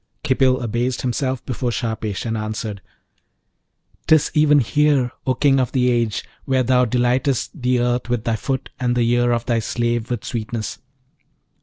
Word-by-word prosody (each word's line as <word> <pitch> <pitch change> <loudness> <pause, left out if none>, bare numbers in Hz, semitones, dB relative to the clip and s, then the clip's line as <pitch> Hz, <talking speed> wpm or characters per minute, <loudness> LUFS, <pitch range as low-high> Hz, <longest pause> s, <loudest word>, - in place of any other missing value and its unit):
Khipil 130 -1 +2
abased 120 +2 -1
himself 130 +1 -2
before 125 -1 -2
Shahpesh, 110 -3 -3
and 115 -1 -1
answered, 110 -2 -4 1.3
''Tis 155 -2 +4
even 150 -1 +5
here, 140 -1 +2 0.2
O 130 - +2
King 135 +1 +3
of 125 -3 -1
the 125 -2 +3
age, 115 -3 0 0.2
where 130 -1 +2
thou 125 +1 +3
delightest 125 +4 0
the 125 0 +2
earth 120 0 0
with 120 -3 -1
thy 115 -1 0
foot 130 +4 -3
and 125 -1 0
the 120 -1 +2
ear 120 0 +2
of 120 -1 0
thy 120 -2 +1
slave 120 0 -1
with 120 -3 -3
sweetness. 115 -1 -4
120 Hz, 160 wpm, -21 LUFS, 115-130 Hz, 1.3 s, even